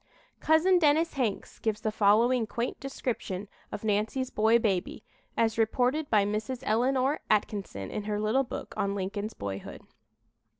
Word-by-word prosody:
Cousin 340 +4 +4
Dennis 315 +1 +3
Hanks 240 -8 -2
gives 215 -1 -1
the 215 -1 -1
following 225 +3 +3
quaint 235 +3 -3
description 225 -7 -4 0.2
of - - -6
"Nancy's 220 +5 0
boy 220 +2 +4
baby," 200 -6 -1 0.3
as 225 -1 +1
reported 250 +7 +1
by 210 -3 +4
Mrs. 215 +5 -3
Eleanor 260 +5 +1
Atkinson 200 - -1
in 210 - -4
her 210 -1 -1
little 215 +5 +2
book 245 - -7
on 200 0 -1
"Lincoln's 205 +2 -4
Boyhood." 100 -1 -6
220 Hz, 140 wpm, -29 LUFS, 205-255 Hz, 0.3 s, Cousin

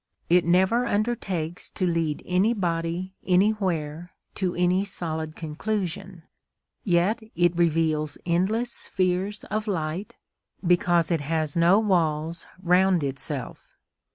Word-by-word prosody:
It 180 0 +5
never 190 +8 +3
undertakes 200 -7 -2
to 185 - -2
lead 165 -3 -1
anybody 180 -2 0
anywhere 180 -4 0 0.2
to 185 -3 -2
any 180 +2 +2
solid 160 -5 -4
conclusion; 185 +2 -4 0.6
yet 190 +5 +2
it 175 0 +3
reveals 160 -3 +1
endless 200 +8 +1
spheres 190 +2 -1
of 215 +1 -1
light, 180 +1 -3 0.5
because 175 -1 +3
it 165 -3 +1
has 155 0 -1
no 170 +3 +5
walls 165 -5 0 0.2
round 180 -1 +4
itself. 140 0 -5
175 Hz, 105 wpm, -25 LUFS, 165-195 Hz, 0.6 s, It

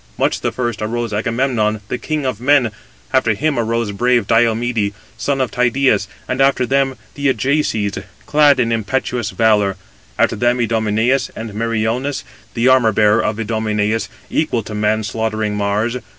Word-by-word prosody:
Much - - 0
the - - -1
first 120 -4 -3
arose 115 +1 -2
Agamemnon, 110 0 0
the 125 - -3
king 155 -3 -2
of 125 -4 -2
men; 135 -3 +3 0.4
after 120 -5 +3
him 150 +1 0
arose 115 -1 -1
brave 120 +2 +2
Diomede, 115 -1 +1 0.2
son 135 +5 -1
of 130 -2 0
Tydeus, 125 +2 +2 0.2
and 130 +1 -1
after 135 -2 +3
them 135 0 +1 0.2
the 145 0 -1
Ajaces, 115 -5 0 0.3
clad 145 -2 +4
in 115 -2 +1
impetuous 115 0 -1
valour: 105 -4 +2 0.4
after - - +2
them 120 +3 +1
Idomeneus, 115 +3 +1
and 110 -2 -6
Meriones, 115 +5 -1 0.3
the 120 +1 +2
armour 130 -4 +5
bearer 105 +1 +3
of 105 +1 -2
Idomeneus, 110 0 -1 0.2
equal 125 -8 0
to 105 - -8
man 105 +1 0
slaughtering 110 -1 -2
Mars. 105 +4 0
115 Hz, 150 wpm, -18 LUFS, 110-130 Hz, 0.4 s, armour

